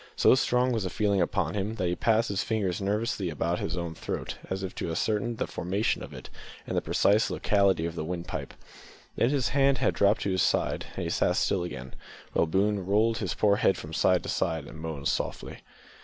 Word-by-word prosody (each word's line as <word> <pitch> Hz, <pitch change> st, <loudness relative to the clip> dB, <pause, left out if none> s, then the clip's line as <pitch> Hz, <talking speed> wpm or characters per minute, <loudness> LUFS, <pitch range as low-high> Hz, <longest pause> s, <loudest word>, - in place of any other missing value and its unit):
So -, -, +5 dB
strong 125 Hz, 0 st, +2 dB
was 115 Hz, -3 st, 0 dB
the 95 Hz, -, -2 dB
feeling 100 Hz, -2 st, +1 dB
upon 85 Hz, -, 0 dB
him 105 Hz, +2 st, -2 dB
that 95 Hz, -, -2 dB
he 90 Hz, -, 0 dB
passed 115 Hz, +4 st, +2 dB
his 100 Hz, -1 st, 0 dB
fingers 100 Hz, -5 st, -1 dB
nervously 100 Hz, -1 st, -1 dB
about 85 Hz, +2 st, -1 dB
his 80 Hz, -, -3 dB
own 85 Hz, -1 st, -3 dB
throat, -, -, -5 dB
as 95 Hz, 0 st, -3 dB
if 95 Hz, -, -4 dB
to -, -, -4 dB
ascertain 105 Hz, +7 st, -1 dB
the -, -, -2 dB
formation 95 Hz, +6 st, -1 dB
of -, -, -8 dB
it -, -, -9 dB, 0.4 s
and -, -, -4 dB
the -, -, +2 dB
precise 105 Hz, +3 st, +3 dB
locality 100 Hz, -5 st, +2 dB
of 85 Hz, -, -3 dB
the 85 Hz, -, -4 dB
windpipe. 85 Hz, +1 st, -5 dB, 0.6 s
Then 120 Hz, -, +2 dB
his 135 Hz, -6 st, +1 dB
hand 140 Hz, +1 st, +3 dB, 0.2 s
dropped 100 Hz, +2 st, +3 dB
to 100 Hz, -, 0 dB
his 95 Hz, -1 st, +1 dB
side, -, -, +1 dB
and -, -, -3 dB
he -, -, -2 dB
sat -, -, +2 dB
still 95 Hz, -, +1 dB
again, 65 Hz, -7 st, -7 dB, 0.4 s
while 85 Hz, -, +2 dB
Boone 100 Hz, +3 st, +1 dB
rolled 110 Hz, +4 st, +2 dB
his 95 Hz, -5 st, -2 dB
poor 100 Hz, -1 st, +3 dB
head 95 Hz, -, +3 dB
from 80 Hz, +1 st, -8 dB
side 90 Hz, +2 st, +3 dB
to -, -, -5 dB
side 80 Hz, -3 st, -1 dB
and 80 Hz, -, -11 dB
moaned 80 Hz, -3 st, -4 dB
softly. -, -, -3 dB
100 Hz, 215 wpm, -28 LUFS, 85-110 Hz, 0.6 s, So